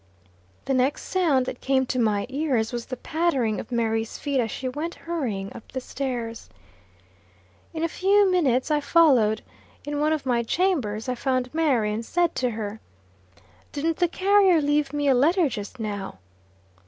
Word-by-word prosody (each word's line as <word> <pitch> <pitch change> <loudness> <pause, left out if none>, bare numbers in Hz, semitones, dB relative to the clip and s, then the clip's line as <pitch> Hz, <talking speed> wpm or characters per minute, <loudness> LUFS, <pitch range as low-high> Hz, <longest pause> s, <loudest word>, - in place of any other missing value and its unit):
The 270 - 0
next 260 +2 +1
sound 315 -9 +1
that - - -6
came 265 -1 +2
to 255 0 -2
my 210 -3 +1
ears 260 -5 -1
was 240 -1 -4
the 255 - -5
pattering 275 -9 0
of 225 - -8
Mary's 225 -1 -1
feet 280 -2 -1
as 230 -2 0
she 260 - -4
went 300 +6 -4
hurrying 235 -13 -4
up - - -12
the 260 - -3
stairs. 245 -4 -5 1.2
In 320 0 -4
a - - +2
few 390 +3 +3
minutes 285 -6 +2
I 300 - +3
followed. 265 -9 +4 0.4
In 290 0 -3
one 305 +1 +2
of 310 -3 -1
my 245 -2 +2
chambers 235 - 0
I 255 - 0
found 255 0 -1
Mary, 260 -10 +1
and 220 +2 -3
said 345 +7 0
to 250 - +1
her: 215 -1 -5 0.9
"Didn't 315 +2 -1
the 355 - +3
carrier 385 0 +4
leave 290 -1 +1
me 290 -1 -1
a 270 - +5
letter 320 +7 +3
just 215 0 -6
now?" 205 - -4
265 Hz, 170 wpm, -25 LUFS, 230-315 Hz, 1.2 s, a